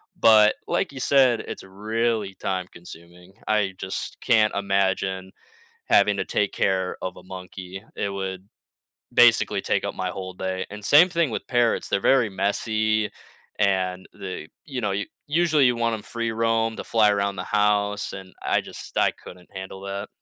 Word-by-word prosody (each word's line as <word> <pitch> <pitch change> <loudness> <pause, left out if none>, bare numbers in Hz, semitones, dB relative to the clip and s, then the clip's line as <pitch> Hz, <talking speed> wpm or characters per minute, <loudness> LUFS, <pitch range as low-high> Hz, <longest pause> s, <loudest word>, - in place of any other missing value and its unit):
but, 110 -1 +6
like 180 -7 -1
you 135 - -6
said, 130 -3 +4
it's - - -7
really 105 +1 -2
time 95 -1 -3
consuming. 85 +2 -13 0.2
I 105 -3 +2
just 95 +1 -5
can't 110 -3 +3
imagine 95 -1 0 0.6
having 100 0 +4
to 95 - -1
take 105 -1 0
care 95 -1 0
of 90 -1 -3
a - - -12
monkey. 95 +1 -9
It 100 - -1
would 95 -1 -5 0.6
basically - - +5
take - - 0
up - - -2
my 95 -1 -2
whole 95 0 -6
day, 95 0 -3
and 105 0 -9
same 160 +10 +7
thing 170 -6 +1
with - - -4
parrots, 120 -2 +1
they're - - +1
very 125 +1 +4
messy, 110 +2 0 0.5
and 95 -2 0
they, 95 -5 -6 0.2
you 135 -5 -5
know 105 -3 -1
u 100 +1 -2 0.2
usually, 155 -2 +3
you 125 - +3
want 115 -1 +1
'em 105 - -6
free 115 0 -3
roam, 115 0 +1
to - - -6
fly 110 -2 +4
around 100 -1 0
the 90 - -3
house, 105 0 +1
and 95 -1 -9
I - - +2
just - - -10
I - - +4
couldn't 90 0 -14
handle 95 0 -7
that. 100 +1 -5
100 Hz, 170 wpm, -24 LUFS, 95-115 Hz, 0.6 s, same